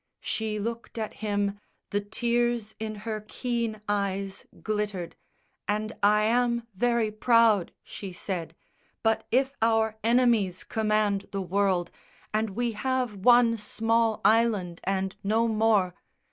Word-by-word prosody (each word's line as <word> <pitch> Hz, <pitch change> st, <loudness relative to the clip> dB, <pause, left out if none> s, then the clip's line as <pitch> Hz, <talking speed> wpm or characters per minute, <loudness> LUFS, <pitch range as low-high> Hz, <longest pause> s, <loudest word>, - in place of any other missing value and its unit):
She 220 Hz, -1 st, -2 dB
looked 230 Hz, +3 st, -5 dB
at 220 Hz, -1 st, -3 dB
him, 205 Hz, -1 st, -2 dB, 0.3 s
the 205 Hz, -, +1 dB
tears 235 Hz, +1 st, 0 dB
in 215 Hz, -1 st, -4 dB
her 215 Hz, -2 st, -3 dB
keen 235 Hz, -4 st, -2 dB
eyes 200 Hz, -1 st, -2 dB, 0.2 s
Glittered 205 Hz, -5 st, -2 dB, 0.5 s
"And 215 Hz, +2 st, -1 dB
I 210 Hz, +1 st, +4 dB
am 235 Hz, +1 st, +1 dB
very 235 Hz, +1 st, +1 dB
proud," 220 Hz, -3 st, +3 dB
she 195 Hz, -2 st, -8 dB
said, 175 Hz, -2 st, -5 dB, 0.5 s
"But 225 Hz, 0 st, +1 dB
if 265 Hz, +3 st, +2 dB
our 220 Hz, -1 st, +2 dB
enemies 230 Hz, -6 st, +3 dB
command 215 Hz, -2 st, 0 dB
the 195 Hz, -1 st, -2 dB
world, 185 Hz, -1 st, +1 dB, 0.4 s
And 215 Hz, -2 st, -1 dB
we 240 Hz, 0 st, 0 dB
have 250 Hz, +1 st, -1 dB
one 235 Hz, +2 st, +5 dB
small 225 Hz, +1 st, +1 dB
island 210 Hz, -6 st, +2 dB
and 190 Hz, 0 st, -1 dB
no 220 Hz, +3 st, +2 dB
more...." 215 Hz, -5 st, +2 dB
215 Hz, 125 wpm, -27 LUFS, 200-230 Hz, 0.5 s, one